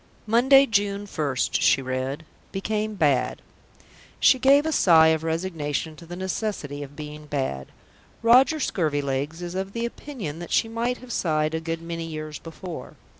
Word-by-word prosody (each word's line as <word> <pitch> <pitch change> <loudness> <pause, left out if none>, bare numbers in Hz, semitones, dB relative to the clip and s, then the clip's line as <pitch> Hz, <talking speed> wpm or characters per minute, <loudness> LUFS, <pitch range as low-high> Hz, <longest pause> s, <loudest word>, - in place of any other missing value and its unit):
"Monday, 260 +5 +6
June 205 -3 0
1st," 145 -9 -1
she 135 - +4
read. 130 +4 -3 0.3
"Became 215 +2 -2
bad." 145 -8 +1 0.8
She 260 - +5
gave 275 +3 +5
a 320 - 0
sigh 165 - +6
of 160 0 +1
resignation 160 -2 -2
to 165 +2 -13
the 175 - -7
necessity 185 -6 -3
of 145 0 -9
being 150 0 -8
bad. 130 - -3 0.6
Roger 260 +7 +5
Scurvilegs 145 - -1
is 175 0 -5
of 190 +1 -4
the 235 0 -2
opinion 235 - -6
that 175 - -7
she - - +3
might 235 +2 -2
have 255 -1 -11
sighed 155 -2 0
a 160 - 0
good 165 0 -4
many 165 0 -5
years 155 -2 -6
before. 165 +1 -8
165 Hz, 160 wpm, -25 LUFS, 150-215 Hz, 0.8 s, Monday